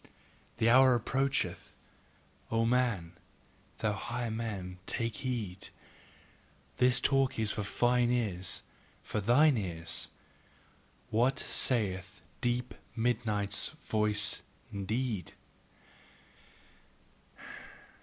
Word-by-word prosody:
The 110 - +2
hour 130 +1 +7
approacheth: 135 +4 -1 0.7
O 115 0 +2
man, 115 -8 +1 0.7
thou 110 -2 0
higher 120 +3 -3
man, 100 -5 -4
take 115 -2 -1
heed! 105 -8 -3 1.1
this 125 0 +4
talk 135 0 +2
is 110 -2 +1
for - - -2
fine 120 +4 +2
ears, 100 -7 -1 0.4
for 105 - -2
thine 130 +6 +5
ears 85 -5 -3 1.0
WHAT 125 +5 +3
SAITH 100 -7 0 0.2
DEEP 125 0 0 0.2
MIDNIGHT'S 110 -4 0
VOICE 105 -1 +1 0.3
INDEED? 110 +1 -2
115 Hz, 85 wpm, -32 LUFS, 100-125 Hz, 1.1 s, hour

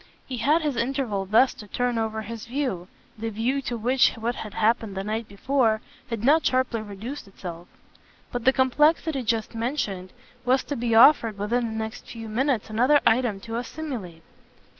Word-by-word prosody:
He 255 - -4
had 300 +8 +2
his 290 -5 -1
interval 235 -6 -1
thus 230 +6 +4
to 210 - -12
turn 245 +2 -1
over 220 0 -2
his 230 +1 -7
view 245 -9 -2 0.3
the 225 +1 -2
view 235 +6 -1
to 245 -2 -3
which 250 +4 +3
what 230 +1 -2
had 215 -3 -8
happened 220 -2 +1
the 195 - -2
night 215 +2 -3
before 225 +1 +1 0.3
had 230 -2 -4
not 305 +5 +5
sharply 255 -3 +1
reduced 215 +6 -7
itself; 175 -3 -9 0.6
but 245 -1 -3
the 265 - +6
complexity 295 +3 +2
just 225 -2 -1
mentioned 225 -6 -3 0.3
was 255 +2 +2
to 290 - -4
be 235 -2 0
offered 230 -3 +6
within 230 +4 0
the 220 0 -5
next 220 +1 -5
few 225 -1 -8
minutes 250 0 0
another 255 +7 +4
item 225 -4 +2
to 225 +1 -5
assimilate. 240 - -6
230 Hz, 175 wpm, -25 LUFS, 215-260 Hz, 0.6 s, the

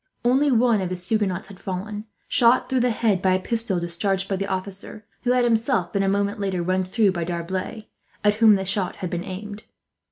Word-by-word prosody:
Only 270 +4 +3
one 235 -3 +3
of 185 - -2
his 180 0 -5
Huguenots 205 -4 0
had 195 -2 -12
fallen, 205 +3 -5 0.2
shot 245 +1 +4
through 260 0 +1
the 245 0 +2
head 215 -4 +1
by 185 -1 +3
a - - +1
pistol 225 -2 0
discharged 190 +3 -1
by 195 - -1
the 195 +1 -3
officer; 195 +2 -5 0.2
who 245 - +3
had 250 0 +3
himself 225 -5 +1
been, 200 - +1
a 195 - +2
moment 200 +1 0
later, 190 -3 -1
run 185 +1 +1
through 195 +2 +2
by 175 -2 -2
D'Arblay, 185 +5 -4 0.4
at 210 0 +4
whom 220 -2 +7
the 190 0 -2
shot 190 -1 -1
had 180 - -5
been 175 0 -2
aimed. 205 +3 -7
200 Hz, 215 wpm, -23 LUFS, 185-220 Hz, 0.4 s, whom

